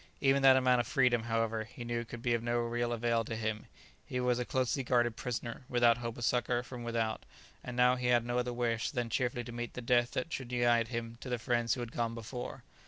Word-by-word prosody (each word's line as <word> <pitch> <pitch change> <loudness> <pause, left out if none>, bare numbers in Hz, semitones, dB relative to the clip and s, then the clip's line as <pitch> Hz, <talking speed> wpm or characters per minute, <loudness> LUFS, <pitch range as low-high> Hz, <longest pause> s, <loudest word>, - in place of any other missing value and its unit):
Even 140 0 +3
that 135 -1 +8
amount 125 -1 +4
of 120 - -7
freedom, 125 -5 +2
however, 115 -1 0
he 120 +2 -9
knew 120 0 -2
could 120 0 -9
be 120 - +2
of 115 - +1
no 120 0 0
real 120 0 -1
avail 115 0 +1
to 115 - -5
him; 110 -1 -3 0.4
he 125 - -4
was 125 -1 +1
a 125 - -1
closely 130 +2 0
guarded 120 -2 +2
prisoner, 120 +1 -4
without 120 -1 +4
hope 115 -1 -5
of 120 - -2
succour 120 -1 +1
from 125 -1 -8
without; 115 -2 -1 0.4
and 125 -1 -6
now 125 0 +5
he 125 -1 -2
had 120 -1 +3
no 120 +1 0
other 125 0 -1
wish 120 -1 -1
than 120 -4 -3
cheerfully 125 -2 0
to 120 - -8
meet 120 0 -5
the - - -4
death 120 0 +2
that 165 0 -3
should 125 -2 -5
unite 120 -2 +3
him 115 -1 -5
to 130 - -6
the 125 - 0
friends 120 -1 +1
who 125 - -5
had 120 -1 -5
gone 115 -1 -2
before. 120 +2 -6
120 Hz, 240 wpm, -32 LUFS, 115-125 Hz, 0.4 s, that